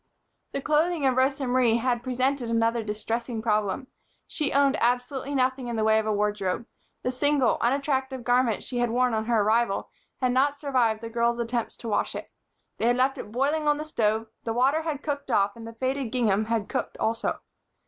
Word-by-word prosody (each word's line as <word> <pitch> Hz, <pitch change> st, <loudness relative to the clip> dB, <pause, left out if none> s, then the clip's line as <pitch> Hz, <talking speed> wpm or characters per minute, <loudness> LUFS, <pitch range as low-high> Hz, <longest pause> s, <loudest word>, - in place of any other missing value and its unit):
The 275 Hz, -, -2 dB
clothing 310 Hz, 0 st, +2 dB
of 260 Hz, -1 st, +3 dB
Rosa 270 Hz, +1 st, +1 dB
Marie 245 Hz, -2 st, +3 dB
had 240 Hz, 0 st, 0 dB
presented 255 Hz, 0 st, -1 dB
another 230 Hz, 0 st, +1 dB
distressing 225 Hz, +2 st, -3 dB
problem. 215 Hz, +1 st, 0 dB, 0.4 s
She 300 Hz, -3 st, -2 dB
owned 280 Hz, -1 st, +3 dB
absolutely 250 Hz, +4 st, 0 dB
nothing 260 Hz, -1 st, +1 dB
in 235 Hz, -, -3 dB
the 220 Hz, -, 0 dB
way 220 Hz, 0 st, +4 dB
of 220 Hz, -, -3 dB
a -, -, +2 dB
wardrobe. 205 Hz, 0 st, -1 dB, 0.4 s
The 250 Hz, -, 0 dB
single, 280 Hz, -1 st, +2 dB
unattractive 265 Hz, 0 st, 0 dB
garment 245 Hz, -2 st, +2 dB
she 245 Hz, -, -3 dB
had 240 Hz, -1 st, +1 dB
worn 250 Hz, +1 st, +2 dB
on 220 Hz, 0 st, 0 dB
her 230 Hz, -3 st, +2 dB
arrival 220 Hz, -1 st, +1 dB, 0.3 s
had 255 Hz, -1 st, +1 dB
not 280 Hz, +3 st, +2 dB
survived 250 Hz, -7 st, +1 dB
the 230 Hz, -, -6 dB
girls' 235 Hz, 0 st, +1 dB
attempts 235 Hz, 0 st, -2 dB
to 235 Hz, -, -8 dB
wash 210 Hz, -, 0 dB
it. -, -, -7 dB, 0.5 s
They 230 Hz, -, +2 dB
had 245 Hz, +1 st, +3 dB
left 265 Hz, +1 st, +1 dB
it 210 Hz, -, -7 dB
boiling 290 Hz, +6 st, 0 dB
on 295 Hz, 0 st, +3 dB
the 305 Hz, -, -5 dB
stove, 220 Hz, -6 st, 0 dB, 0.2 s
the 225 Hz, -, -2 dB
water 270 Hz, +6 st, +2 dB
had 310 Hz, -3 st, -4 dB
cooked 285 Hz, -2 st, -3 dB
off 200 Hz, -4 st, +2 dB
and 230 Hz, -1 st, -9 dB
the 230 Hz, -, -8 dB
faded 260 Hz, +1 st, -2 dB
gingham 220 Hz, -4 st, +2 dB
had 225 Hz, -2 st, -1 dB
cooked -, -, -3 dB
also. 225 Hz, +1 st, -1 dB
245 Hz, 200 wpm, -26 LUFS, 225-270 Hz, 0.5 s, way